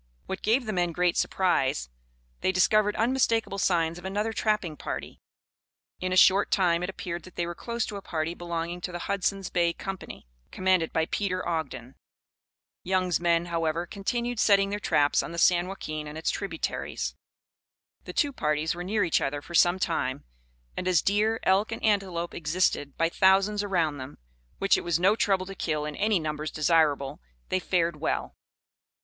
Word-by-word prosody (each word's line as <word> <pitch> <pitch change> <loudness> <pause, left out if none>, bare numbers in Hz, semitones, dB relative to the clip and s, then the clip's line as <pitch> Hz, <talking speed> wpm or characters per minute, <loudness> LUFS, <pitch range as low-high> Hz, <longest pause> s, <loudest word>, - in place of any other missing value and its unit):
What 190 - -5
gave 240 +4 +2
the 215 - -2
men 175 -2 0
great 180 0 +1
surprise, 135 - +1 0.5
they - - +1
discovered 210 +3 +3
unmistakable 225 -4 +1
signs 170 -2 +1
of - - -14
another 205 +4 -2
trapping 210 -8 0
party. - - -6 0.8
In 185 0 -2
a 185 - +1
short 195 +2 +6
time 175 -3 +2
it 180 - -2
appeared 175 -2 -5
that 185 +2 -15
they 175 - -1
were 175 - -4
close 235 +4 -3
to 205 - -6
a - - -7
party 160 -2 -3
belonging 170 0 -4
to 180 - -4
the 175 - -4
Hudson's 195 -1 -1
Bay 170 -1 +2
Company, 195 - -7 0.2
commanded 185 -3 +1
by 160 - +1
Peter 185 0 -2
Ogden. 135 -7 -3 0.9
Young's 185 -1 +1
men, 170 0 +2
however, 165 0 -1
continued 235 +5 -3
setting 195 -1 +4
their 205 - -2
traps 145 -7 +2
on 170 - -7
the - - -6
San 175 +1 +4
Joaquin 155 -5 -5
and 150 +1 -7
its 160 - 0
tributaries. 175 -5 -3 0.9
The - - -7
two 285 -1 +1
parties 150 - 0
were 175 +1 -6
near 205 +3 0
each 165 - +2
other 145 +1 -1
for 170 - -12
some 175 +2 +5
time, 135 -7 -1 0.5
and 180 - -3
as 180 -4 +3
deer, 215 +3 +2
elk, 195 +4 +2
and 225 - -5
antelope 190 -5 0
existed 155 -3 0
by 165 0 +2
thousands 195 +3 +3
around 170 -8 0
them, 130 +2 -8 0.4
which 195 - +3
it - - -7
was 170 -1 +1
no 195 +4 +4
trouble 195 -4 +1
to 195 - -7
kill 155 -5 -2
in 150 -1 -5
any 210 0 +2
numbers 155 -1 -3
desirable, 150 -3 +1 0.3
they 185 - +1
fared 170 -3 0
well. 155 - -2
180 Hz, 180 wpm, -27 LUFS, 165-195 Hz, 0.9 s, short